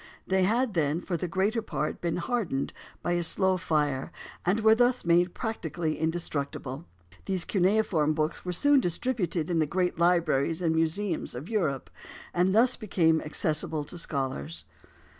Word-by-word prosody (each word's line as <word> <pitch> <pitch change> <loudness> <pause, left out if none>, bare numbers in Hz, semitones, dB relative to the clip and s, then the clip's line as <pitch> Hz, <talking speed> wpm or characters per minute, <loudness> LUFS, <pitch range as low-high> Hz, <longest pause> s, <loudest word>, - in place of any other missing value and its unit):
They 190 0 +1
had 230 +3 +1
then, 155 -2 +1
for 180 0 -3
the 175 +2 -2
greater 195 +6 0
part, 150 -8 -3
been 170 -1 -1
hardened 175 - -2 0.3
by 175 - -1
a 175 0 +1
slow 185 +3 +2
fire, 150 -5 -1 0.3
and 185 +5 +1
were 220 0 +6
thus 245 0 +2
made 175 +1 +3
practically 175 - -3
indestructible. 150 -3 -3 0.4
These 190 -3 -1
cuneiform 185 -6 +2
books 155 +1 -1
were 180 - -3
soon 285 +10 +4
distributed 180 -5 -1
in 170 -2 0
the 155 - +2
great 180 +2 -1
libraries 170 -3 +2
and 165 -3 +1
museums 165 0 -1
of 135 +8 -7
Europe, 165 - -1 0.4
and 180 +2 +2
thus 245 +3 +4
became 165 -7 +2
accessible 155 0 0
to 160 - -6
scholars. 85 - -3
175 Hz, 155 wpm, -28 LUFS, 155-195 Hz, 0.4 s, were